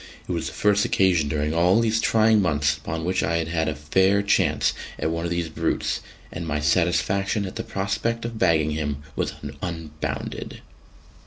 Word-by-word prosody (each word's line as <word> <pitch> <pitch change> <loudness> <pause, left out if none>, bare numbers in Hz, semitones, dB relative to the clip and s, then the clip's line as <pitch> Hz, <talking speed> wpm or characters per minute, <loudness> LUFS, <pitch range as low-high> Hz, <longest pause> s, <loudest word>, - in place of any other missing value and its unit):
It - - -4
was - - -2
the - - -6
first 105 0 +3
occasion 90 -6 +2
during 75 +1 -1
all 90 +5 +4
these 115 -1 +2
trying 110 -1 +4
months 75 -4 +2
upon 80 +2 -5
which 90 +1 +1
I 85 - +1
had 80 -1 -2
had 80 -1 0
a 75 - -1
fair 95 +7 +2
chance 100 - +2 0.2
at 80 - -1
one 80 +1 -2
of - - -1
these 85 -1 -1
brutes, 80 - -1 0.3
and 80 0 -5
my 75 -1 -1
satisfaction 95 +5 +1
at 95 - -7
the - - -3
prospect 105 +4 -2
of 115 -1 -5
bagging 80 -4 +3
him 75 -2 -3
was - - -1 0.3
unbounded. 80 -3 -5
85 Hz, 180 wpm, -24 LUFS, 75-100 Hz, 0.3 s, all